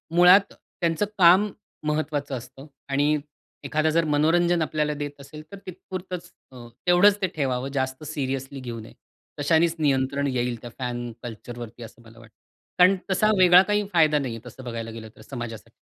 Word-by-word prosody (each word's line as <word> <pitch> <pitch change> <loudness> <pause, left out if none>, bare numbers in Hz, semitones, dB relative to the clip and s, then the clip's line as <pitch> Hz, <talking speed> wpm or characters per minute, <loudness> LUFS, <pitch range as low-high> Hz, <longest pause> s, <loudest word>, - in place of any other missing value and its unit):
मुळात 180 +3 +6
त्यांचं 170 +3 -2
काम 185 +3 +6 0.4
महत्त्वाचं 150 -2 -2
असतं. 130 +3 -12 0.2
आणि 145 +2 +2 0.5
एखादा 155 +1 +1
जर 165 +1 +2
मनोरंजन 165 +3 +2
आपल्याला 150 -1 -1
देत 145 0 -5
असेल, 140 +2 -11
तर 200 - -8
तिथेपुरतंच 180 -1 -7 0.2
अ, 125 -2 -11 0.2
तेवढंच 200 +4 +5
ते 190 - +2
ठेवावं, 130 -3 -1
जास्त 130 +1 -2
सीरियसली 135 -2 -4
घेऊ 120 -3 -6
नये. 110 - -12 0.5
तशानेच 160 +3 +2
नियंत्रण 140 -1 +1
येईल 125 -3 -2
त्या 120 - -8
फॅन 120 -1 -4
कल्चरवरती, 120 0 -8
असं 115 +1 -13
मला 115 0 -17
वाटतं. 115 -2 -18 0.4
कारण 185 +2 +7 0.2
तसा 200 +3 +3
वेगळा 180 -1 +8
काही 210 +1 0
फायदा 155 -3 +4
नाहीये, 120 -5 -4
तसं 125 +2 -11
बघायला 115 -2 -5
गेलं 110 -1 -9
तर - - -16
समाजासाठी. 120 -4 -7
145 Hz, 160 wpm, -24 LUFS, 125-170 Hz, 0.5 s, वेगळा